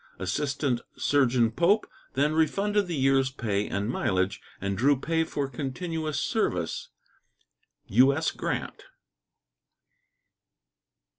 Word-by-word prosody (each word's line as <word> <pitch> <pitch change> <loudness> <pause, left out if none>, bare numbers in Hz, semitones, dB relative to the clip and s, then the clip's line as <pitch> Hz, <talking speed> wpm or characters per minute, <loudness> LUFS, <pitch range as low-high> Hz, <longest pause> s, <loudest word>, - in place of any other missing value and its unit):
Assistant 130 +6 -1 0.2
Surgeon 125 -5 +3
Pope 185 - +3 0.3
then 145 +3 +2
refunded 200 +6 +1
the 170 - -2
year's 135 -1 +3
pay 105 -6 -2
and 100 +1 -2
mileage 95 -5 0 0.2
and 100 0 -2
drew 135 +6 +3
pay 160 +3 +1
for 145 -3 -3
continuous 155 +4 -3
service. - - -1 1.0
U.S. 140 +8 +3
GRANT. - - -4
140 Hz, 95 wpm, -27 LUFS, 120-160 Hz, 1.0 s, Surgeon